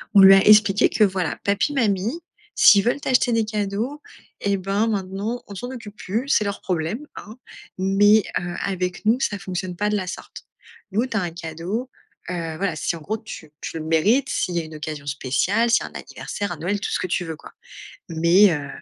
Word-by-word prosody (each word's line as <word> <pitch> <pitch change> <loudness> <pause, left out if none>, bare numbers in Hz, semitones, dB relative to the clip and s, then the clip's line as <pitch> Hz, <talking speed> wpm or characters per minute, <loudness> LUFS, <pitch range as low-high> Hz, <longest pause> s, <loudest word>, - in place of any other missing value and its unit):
on 200 - +9
lui 195 0 +10
a - - +7
expliqué 210 -2 +6
que 215 - +2
voilà, 185 -5 0
papi, 200 +8 +1
mamie, 225 - 0 0.4
s'ils 200 -2 +7
veulent 245 +6 0
t'acheter 250 -3 +2
des 225 -1 +2
cadeaux 215 +7 -3 0.4
et 200 -1 +1
ben 195 +4 0
maintenant, 205 +3 -3
on 200 - -9
s'en 245 +6 -5
occupe 220 -5 -9
plus, 220 +7 -3
c'est 245 - +3
leur 200 0 -4
problème, 180 - -2
hein. 215 +2 -10 0.4
Mais, 205 +3 +4 0.2
heu, 175 0 -5
avec 180 0 -3
nous, 225 +4 +3
ça 205 -6 -1
fonctionne 185 -2 -5
pas 210 +3 0
de 210 - 0
la 195 -3 -1
sorte. - - -8 0.5
Nous, 220 +6 +1
tu 230 -3 -2
as - - +1
un 175 -2 -3
cadeau, 170 +9 -5 0.4
heu, 165 -3 -4
voilà, 195 +2 -1
si - - -2
en 165 - -10
gros 215 +8 -3
tu 210 -8 -10
tu - - -5
le - - -5
mérites, 205 - +2
s'il 180 - -1
y - - +2
a - - -8
une 155 0 -10
occasion 150 -1 -6
spéciale, 170 - 0
si 235 - +3
un - - -8
anniversaire, 200 -3 -5
un 175 - -5
Noël, 185 +6 -2
tout - - -4
ce - - 0
que - - -2
tu 180 0 -1
veux 160 -1 -5
quoi, - - -14 0.6
mais, 170 +5 +5
heu, 145 -3 -3
195 Hz, 215 wpm, -22 LUFS, 175-220 Hz, 0.6 s, lui